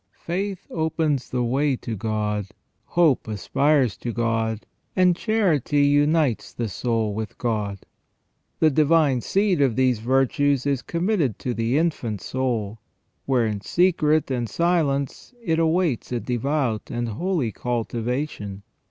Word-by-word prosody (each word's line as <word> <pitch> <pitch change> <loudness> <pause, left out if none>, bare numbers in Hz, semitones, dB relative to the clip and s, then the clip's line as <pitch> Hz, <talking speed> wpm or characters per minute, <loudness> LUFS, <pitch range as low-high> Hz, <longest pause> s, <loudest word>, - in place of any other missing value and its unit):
Faith 190 +2 -3
opens 160 -5 -1
the 125 -1 -1
way 135 +3 +1
to 115 -2 -5
God, 105 -1 -2 0.4
hope 160 -8 +2
aspires 130 - +1
to 120 - -4
God, 115 -1 -1 0.3
and 180 -2 +4
charity 170 - +1
unites 145 -2 +2
the 115 - -2
soul 110 +1 -1
with 110 +1 -5
God. 105 -5 -2 0.8
The 155 - +4
divine 150 -3 +3
seed 195 - +1
of 130 -5 +2
these 130 -3 +2
virtues 135 +3 +1
is 140 -3 0
committed 170 - 0
to 125 - -3
the 115 +4 0
infant 140 - -1
soul, 115 -4 -2 0.5
where 130 -4 +2
in 105 -2 -2
secret 155 - +2
and 120 -3 -1
silence 160 - 0
it 165 -8 0
awaits 165 -6 +1
a 120 - 0
devout 125 -1 -1
and 120 0 -2
holy 145 - -1
cultivation. 120 -3 -3
130 Hz, 130 wpm, -23 LUFS, 115-160 Hz, 0.8 s, and